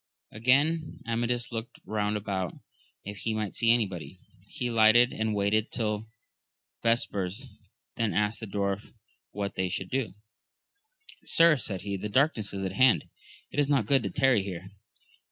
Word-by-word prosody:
Again 145 +8 +1
Amadis 120 +1 -1
looked 115 0 -6
round 105 -1 -1
about 95 -4 -3 0.5
if 100 +1 -7
he 110 +2 -2
might 105 -2 -3
see 115 - +2
anybody; 95 - -1 0.3
he 125 - -5
alighted 115 +1 +5
and 110 -1 -1
waited 105 +2 +1
till 110 -2 -2 0.7
vespers, 115 0 0 0.5
then 115 -3 +1
asked 105 +1 0
the 110 - -6
dwarf 100 0 -2 0.4
what 100 0 -4
they 95 -1 -1
should 90 +1 -4
do? 130 -7 -2 1.1
Sir, 165 -1 +5
said 100 -7 -3
he, 100 -1 -3
the 105 +3 -5
darkness 120 -3 +2
is 95 -1 -4
at 95 - -2
hand: 130 - +3 0.4
it - - -2
is 145 -1 +2
not 135 -7 +3
good 135 +3 +3
to - - -3
tarry 135 -6 +3
here. 95 -1 -7
110 Hz, 155 wpm, -28 LUFS, 100-120 Hz, 1.1 s, alighted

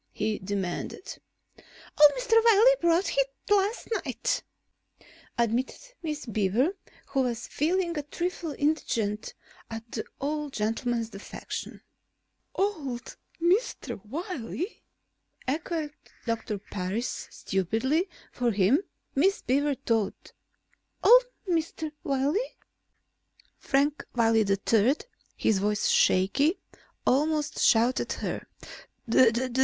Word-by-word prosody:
he 215 0 -1
demanded. 195 - -4 0.4
"Old 295 -1 +3
Mr. - - -1
Wiley 460 +2 +7
brought 340 +2 +2
it 275 0 +3 0.2
last 410 +3 +2 0.2
night," 250 -5 -1 1.0
admitted 235 +3 0 0.2
Miss 305 -3 -4
Beaver, 225 - +1 0.3
who 270 - +1
was 240 -2 -2
feeling 340 +3 0
a 300 - -1
trifle 340 +3 -3
indignant 230 -9 -1 0.3
at 225 0 -6
the 220 - -3 0.2
old 295 0 -2
gentleman's 225 +1 -1
defection. 195 0 -7 0.7
"Old 285 - -2 0.2
Mr. 355 - 0
Wiley?" 335 - -4 0.7
echoed 310 +1 -2 0.3
Doctor 225 -3 -2
Parris; 200 +4 -4
stupidly, 225 - 0 0.2
for 245 -1 0
him, 210 +5 +3 0.3
Miss 380 +8 +2
Beaver 285 +2 +2
thought. 225 -6 -2 0.7
"Old - - +8 0.2
Mr. 325 -2 -1
Wiley?" 285 - 0 1.0
Frank 285 +2 +1
Wiley 225 -2 +3
III, 215 +6 +3 0.4
his 210 -3 +2
voice 210 +1 +1
shaky, 275 - +3 0.5
almost 300 +3 +1
shouted 235 +3 +4
at - - -8
her. - - -3
270 Hz, 95 wpm, -28 LUFS, 225-325 Hz, 1.0 s, Old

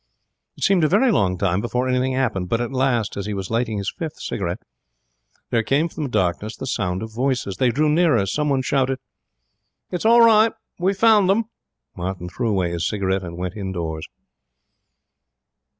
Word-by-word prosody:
It - - -6
seemed 190 -4 +3
a - - +5
very 215 - +3
long 95 - +1
time 90 0 0
before 125 +2 -1
anything 130 +1 +1
happened, 100 -9 -1
but 115 - +1
at 120 +2 -2
last, 125 -6 0
as 100 - -4
he 105 - -3
was 95 0 -5
lighting 115 -2 0
his 100 -1 -3
fifth 160 -3 -6
cigarette, - - -4 0.9
there 115 - +3
came 145 +8 +1
from 160 - -7
the - - -4
darkness 95 +1 -1
the - - -6
sound 95 -6 -2
of 110 -1 -8
voices. 120 -6 -1
They 125 - +3
drew 150 +6 +1
nearer. 150 - +3
Someone 140 +5 0
shouted: 135 0 +1 0.9
'It's 180 - -3
all 235 +2 +6
right. 225 -1 +6 0.3
We've 190 +2 +1
found 210 -3 +5
them.' 215 +4 +2 0.5
Martin 90 0 -4
threw 115 +5 -2
away 95 -4 0
his 85 0 -1
cigarette 95 -2 -1
and 85 -2 -7
went 90 +1 -4
indoors. 85 -6 -4
120 Hz, 180 wpm, -22 LUFS, 95-150 Hz, 0.9 s, all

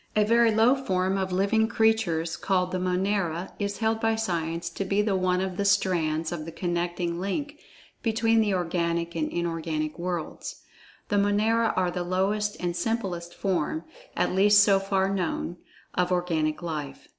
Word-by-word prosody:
A 215 - +4
very 230 +1 +4
low 225 +3 +4
form 190 -8 0
of 190 -1 -1
living 200 +4 +2
creatures 220 -8 +1
called 180 0 0
the 185 - -1
Monera, 185 -1 -1
is 200 -1 -2
held 225 0 0
by 225 0 +2
Science 170 -5 -2
to 195 - -3
be 200 +2 +1
the 205 -2 +1
one 185 0 +1
of 190 -1 -3
the 200 - 0
strands 170 -6 +1
of 170 -3 -4
the 165 - -6
connecting 175 0 -2
link 290 +10 -3 0.4
between 225 0 +2
the 210 -2 +1
organic 170 -1 -1
and 155 -2 -1
inorganic 165 -2 -3
worlds. 175 -2 -5 0.5
The 205 - +1
Monera 215 +3 +2
are 185 -1 +1
the 180 - -3
lowest 195 +4 0
and 175 -1 -2
simplest 175 -4 -3
form 170 -4 -1 0.3
(at 180 - +1
least 200 +2 +6
so 200 -1 +4
far 195 0 +1
known) 180 -2 -2 0.4
of 180 0 0
organic 165 -3 0
life. 150 -5 -5
185 Hz, 165 wpm, -26 LUFS, 170-205 Hz, 0.5 s, least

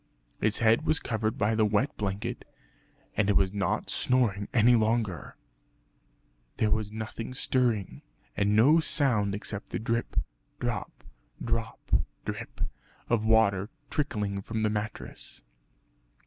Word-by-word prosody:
Its 110 0 +2
head 115 +4 +4
was 155 -1 +3
covered 110 -1 -1
by 110 -1 +2
the 110 0 +3
wet 105 +6 +1
blanket 100 0 -3 0.7
and 105 -1 +2
it 100 - +3
was 95 0 +3
not 100 -1 -1
snoring 110 -6 +1
any 120 +1 +5
longer. 110 -7 0 1.2
There 105 -1 +2
was 110 -1 0
nothing 110 +3 -6
stirring, 120 -7 0 0.3
and 100 +1 +2
no 140 +10 +6
sound 120 -11 +2
except 105 0 -6
the - - -2
drip, 115 +1 -2 0.4
drop, - - -4 0.4
drop 115 -1 -2 0.5
drip - - -6 0.5
of 110 -2 +2
water 105 -3 +3 0.2
trickling 105 -9 -1
from 110 +2 -3
the 105 - +2
mattress. 105 0 -5
110 Hz, 125 wpm, -29 LUFS, 105-115 Hz, 1.2 s, no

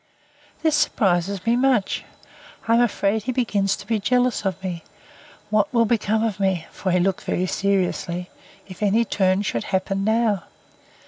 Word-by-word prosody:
This 315 -2 +3
surprises 190 - +1
me 230 +1 +3
much. 250 -5 +1 0.6
I 230 - +3
am 235 - +5
afraid 220 -2 +1
he 255 - -3
begins 205 -6 0
to - - -11
be 220 0 0
jealous 250 +1 +1
of 190 -1 -1
me. 175 -3 -4 0.7
What 210 -1 +2
will 235 -2 +3
become 220 -1 +1
of 215 -3 -2
me, 190 -4 0
(for 190 - -3
he 180 - +3
looked 190 +1 0
very 185 - -1
seriously,) 185 -2 -1 0.3
if 185 0 -12
any 215 +3 +3
turn 190 -1 +1
should 115 - -2
happen 195 +1 -1
now! 220 -3 +1
200 Hz, 165 wpm, -23 LUFS, 190-230 Hz, 0.7 s, am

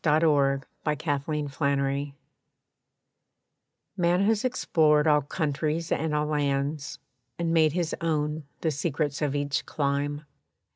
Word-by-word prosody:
=The 155 - +2
Undiscovered 150 0 0
Country= 140 0 0 1.8
Man 175 -1 +2
has 215 +1 +2
explored 155 -11 +3
all 150 -1 +4
countries 155 +2 -2
and 155 0 0
all 150 0 +1
lands, 145 -1 -1 0.4
And 170 -1 0
made 155 -2 +4
his 175 -2 -1
own 155 -2 -1 0.2
the 160 - +1
secrets 145 -1 -2
of 145 -2 0
each 145 -1 -1
clime. 145 +1 -1
150 Hz, 110 wpm, -27 LUFS, 145-160 Hz, 1.8 s, all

